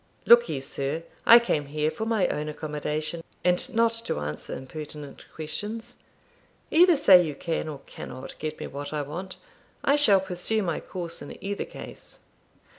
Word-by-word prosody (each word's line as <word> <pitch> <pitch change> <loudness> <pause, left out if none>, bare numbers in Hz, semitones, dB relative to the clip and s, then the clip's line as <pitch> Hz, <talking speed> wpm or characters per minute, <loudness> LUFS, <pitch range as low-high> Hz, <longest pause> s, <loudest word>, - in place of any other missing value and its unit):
'Look 235 0 +7
ye, 150 -4 -2
sir; 140 +4 -3 0.2
I 235 - +11
came 155 -12 0
here 150 +2 0
for 220 +8 -4
my 225 -4 +2
own 150 +1 -2
accommodation, 155 +2 -3 0.2
and 180 +9 +2
not 230 0 +4
to - - -2
answer 75 +1 -5
impertinent 150 +1 -8
questions. 215 +9 -5 0.8
Either 350 +2 +7
say 195 -11 +8
you 150 -4 -4
can, 165 +2 -2
or 145 -3 -6
cannot, 130 +1 -8
get 155 0 -4
me - - -4
what 145 +1 -6
I 150 -1 -1
want; 180 +6 -7 0.5
I 280 - +4
shall 215 -10 +5
pursue 190 +4 -1
my 170 -4 -1
course 170 -2 -6
in 145 - -8
either 200 +1 -2
case.' - - -11
Mr. - - -32
165 Hz, 170 wpm, -26 LUFS, 150-210 Hz, 0.8 s, I